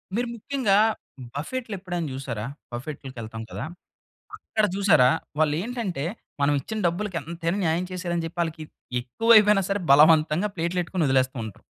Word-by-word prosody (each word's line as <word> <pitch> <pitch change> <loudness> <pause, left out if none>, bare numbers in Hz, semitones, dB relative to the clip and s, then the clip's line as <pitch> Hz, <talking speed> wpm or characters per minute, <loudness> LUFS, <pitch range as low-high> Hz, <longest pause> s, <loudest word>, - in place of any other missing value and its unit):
మీరు 240 +2 0
ముఖ్యంగా 235 -4 +1 0.6
బఫెట్లెప్పుడైనా 185 - -4
జూసారా? 125 -5 -4 0.3
బఫెట్‌లకి 130 +1 -7
ఎళ్తాం 110 0 -7
కదా! - - -4 0.7
అక్కడ 215 - -1
జూసారా? 195 -10 +5 0.3
వాళ్లేంటంటే 175 - -1 0.4
మనం 145 +1 +3
ఇచ్చిన 220 +9 -5
డబ్బులకి 180 +2 -2
ఎంతైనా 170 +3 -3
న్యాయం 165 +2 +1
చేశారని 175 -2 -2
చెప్పి 170 +1 -5
ఆళ్ళకి 160 -1 -6 0.4
ఎక్కువైపోయినా 210 - +5
సరే 200 +1 0
బలవంతంగా 155 +5 +5
ప్లేట్‌లో 170 +2 0
ఎట్టుకొని 175 -2 -1
వదిలేస్తూంటారు. 130 -5 0
170 Hz, 125 wpm, -25 LUFS, 145-200 Hz, 0.7 s, జూసారా